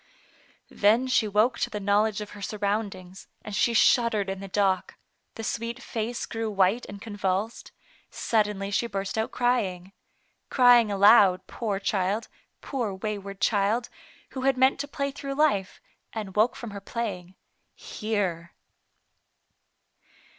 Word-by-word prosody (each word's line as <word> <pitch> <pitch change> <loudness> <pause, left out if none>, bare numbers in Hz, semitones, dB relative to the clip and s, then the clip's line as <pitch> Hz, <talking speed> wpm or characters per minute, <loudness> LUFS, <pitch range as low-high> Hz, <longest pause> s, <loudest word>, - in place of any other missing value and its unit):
Then 220 +5 +3
she 255 -4 +2
woke 215 +5 +2
to - - 0
the 210 - -4
knowledge 205 +1 +1
of 210 - -7
her 205 - -11
surroundings, 200 -3 -3 0.2
and 210 - -5
she 235 +3 +2
shuddered 220 -4 +3
in 195 - -5
the 195 - -7
dock; 195 -1 0 0.4
the 225 - -6
sweet 230 +2 -3
face 235 -2 -4
grew 225 -1 -3
white 195 +3 +1
and 200 - -8
convulsed; 205 0 -3 0.4
suddenly 210 -3 -1
she 235 +4 0
burst 195 -3 -4
out 220 0 -1
cry 245 -1 +2
ing. 185 0 -7 0.6
Crying 245 -3 +6
aloud, 195 -2 +6
poor 210 -4 -3
child, 200 +2 -1 0.3
poor 235 -8 -3
wayward 200 -1 -5
child, 215 +3 +1 0.4
who 260 - -5
had 265 0 +2
meant 260 +2 +3
to 285 - -3
play 280 -1 -3
through 275 0 -6
life, 275 -11 +1 0.3
and 210 -4 -6
woke 220 +4 +3
from 235 -3 -7
her 200 0 -7
playing 195 -5 -5 0.3
— - - -48
here. 190 -6 -3
210 Hz, 145 wpm, -26 LUFS, 195-235 Hz, 0.6 s, Crying